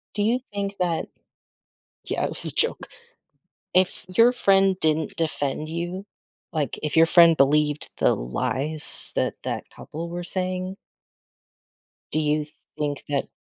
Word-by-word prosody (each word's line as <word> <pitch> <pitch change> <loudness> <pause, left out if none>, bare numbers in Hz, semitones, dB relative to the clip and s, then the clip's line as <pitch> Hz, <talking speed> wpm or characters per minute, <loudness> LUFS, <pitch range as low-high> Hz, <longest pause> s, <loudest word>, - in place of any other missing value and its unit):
Do 205 - 0
you 235 +4 +2
think 200 0 -3
that 175 -3 -1 1.0
Yeah, - - -2
it - - 0
was - - +3
a - - +4
joke. 465 - 0 0.9
If 185 0 +2
your 230 +7 +5
friend 195 -4 +3
didn't 155 0 0
defend 155 -2 -2
you 175 +4 -4 0.5
like, 150 -5 -2
if 150 +1 -2
your 165 0 +7
friend 170 -1 +6
believed 150 +2 +2
the - - +3
lies 130 - +1
that - - 0
that - - -3
couple 165 +2 -8
were 175 0 -5
saying 185 +1 -2 1.4
do 155 - +1
you 150 0 0 0.3
think 145 -2 -3
that 140 -1 -1
165 Hz, 140 wpm, -24 LUFS, 150-185 Hz, 1.4 s, your